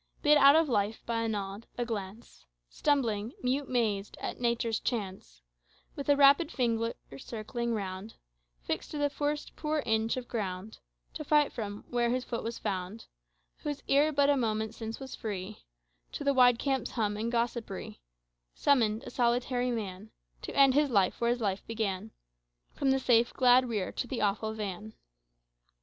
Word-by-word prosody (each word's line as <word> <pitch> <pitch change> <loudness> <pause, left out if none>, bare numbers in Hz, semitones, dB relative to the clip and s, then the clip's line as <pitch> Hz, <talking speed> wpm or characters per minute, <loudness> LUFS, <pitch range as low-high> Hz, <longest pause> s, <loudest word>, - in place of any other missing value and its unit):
Bid 300 0 +6
out 280 +1 +8
of 320 0 +4
life 215 -3 -1
by 230 -1 -1
a 230 - 0
nod, 205 0 -4
a 240 - -1
glance, 210 - -7 0.2
Stumbling, 235 -6 0
mute 265 +2 0
mazed, 215 -5 -1
at - - -5
Nature's 235 -2 0
chance 195 - -4 0.5
With 280 0 -5
a 285 - +6
rapid 285 +3 +5
finger 230 -3 0 0.2
circling 235 - -3
round, 195 +1 -5 0.5
Fixed - - -3
to 300 - -5
the 290 -1 +1
first 295 +1 -3
poor 305 -1 -1
inch 225 +1 +1
of 250 -1 -5
ground 200 -2 -4 0.3
To - - -5
fight 295 0 +3
from, 205 -3 -5
where 240 -1 +1
his 250 +1 0
foot 235 -2 -4
was 230 +1 -4
found, 195 +1 -4 0.5
Whose 290 -1 -5
ear 290 +3 +4
but 285 -1 +3
a - - +3
moment 220 -3 -1
since 225 0 -6
was 265 -1 -8
free 205 -1 -5 0.5
To - - -4
the 280 -1 +3
wide 250 -2 +6
camp's 270 +1 -1
hum 210 -3 0
and 225 +3 -2
gossipry 235 - -3 0.6
Summoned, 225 -6 +2
a - - -8
solitary 245 +1 +1
man, 210 -3 -4 0.3
To - - -7
end 275 -1 +7
his 290 +1 +3
life 200 -4 +2
where 235 - +2
his 240 0 0
life 200 -2 -1
began, 215 -2 -2 0.6
From 275 - 0
the 265 - +4
safe 240 -2 +3
glad 250 0 +5
rear 210 -5 -2
to 245 - -4
the 250 - -3
awful 215 +1 0
van." 210 0 -6
235 Hz, 170 wpm, -30 LUFS, 210-265 Hz, 0.6 s, out